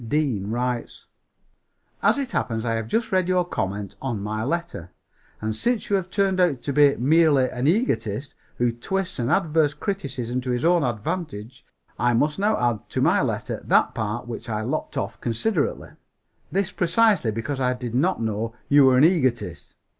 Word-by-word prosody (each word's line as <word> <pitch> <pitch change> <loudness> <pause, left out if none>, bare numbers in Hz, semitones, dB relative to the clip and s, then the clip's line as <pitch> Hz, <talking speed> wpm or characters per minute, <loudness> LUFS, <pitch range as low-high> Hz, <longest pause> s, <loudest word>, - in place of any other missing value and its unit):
Deane 115 -6 -1
writes: 120 +1 -3 1.0
"As - - +3
it 275 -2 -3
happens 110 0 -2
I 115 - 0
have 115 -1 -2
just 225 - -1
read 185 -2 +2
your 180 -1 +2
comment 100 - -4
on 120 -6 -2
my 105 +2 -3
letter; 140 - -3 0.5
and 110 0 -3
since 235 - -1
you - - +4
have 185 -2 -2
turned 195 -1 +1
out 160 -9 +2
to 140 - -2
be 145 0 +5
merely 145 0 +4
an 125 +2 -1
egotist 130 - 0 0.2
who 120 0 +2
twists 180 +9 -3
an 120 0 0
adverse 155 -2 +2
criticism 135 - -3
to 125 - -5
his 125 +3 0
own 170 -2 +4
advantage, 120 - -4 0.4
I 120 -1 +2
must 150 +8 +1
now 210 +2 +2
add 120 -3 -1
to - - -2
my - - +4
letter - - -3
that - - +3
part 110 +3 -3
which 120 0 -7
I 110 -1 -2
lopped 140 +5 -3
off - - -4
considerately. 145 - -1 0.6
This 195 -1 0
precisely 195 - +2
because 115 +6 -3
I 125 -1 +1
did 125 -2 -6
not 170 +10 +1
know 115 +1 -2
you 145 -1 +6
were 130 -1 +5
an 130 - +5
egotist. 130 - +1
130 Hz, 175 wpm, -24 LUFS, 115-170 Hz, 1.0 s, you